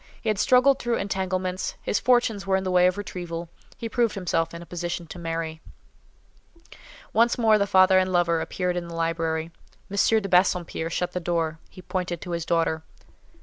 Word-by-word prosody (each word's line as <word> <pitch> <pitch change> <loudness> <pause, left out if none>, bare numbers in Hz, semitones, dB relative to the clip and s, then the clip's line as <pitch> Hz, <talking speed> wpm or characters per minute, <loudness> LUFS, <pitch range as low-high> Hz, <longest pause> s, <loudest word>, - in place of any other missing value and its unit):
He 225 - -2
had 210 -3 0
struggled 260 +2 +4
through 240 -1 0
entanglements; 185 -1 -2
his 200 - -1
fortunes 230 -5 +2
were 190 - +3
in 190 - 0
the 185 - -2
way 180 0 +5
of 185 - 0
retrieval; 175 -4 -5 0.3
he 230 - -4
proved 230 -1 0
himself 165 -3 -1
in 170 - -8
a - - -13
position 175 0 -4
to 175 - -10
marry. 165 -1 -4 1.5
Once 235 +1 +3
more 220 -3 +4
the 200 - +1
father 185 0 +5
and 185 0 0
lover 170 -2 +2
appeared 180 +1 -2
in 175 -1 -3
the 170 - -8
library. 165 -1 -1 0.4
M. 215 +2 +3
de 200 - -4
Bassompierre 180 -3 +1
shut 175 +1 -2
the 180 - -3
door; 165 -2 -1
he 185 - -13
pointed 180 -2 -3
to 180 - -6
his 170 -1 -2
daughter. 165 -1 +1
180 Hz, 190 wpm, -25 LUFS, 170-195 Hz, 1.5 s, way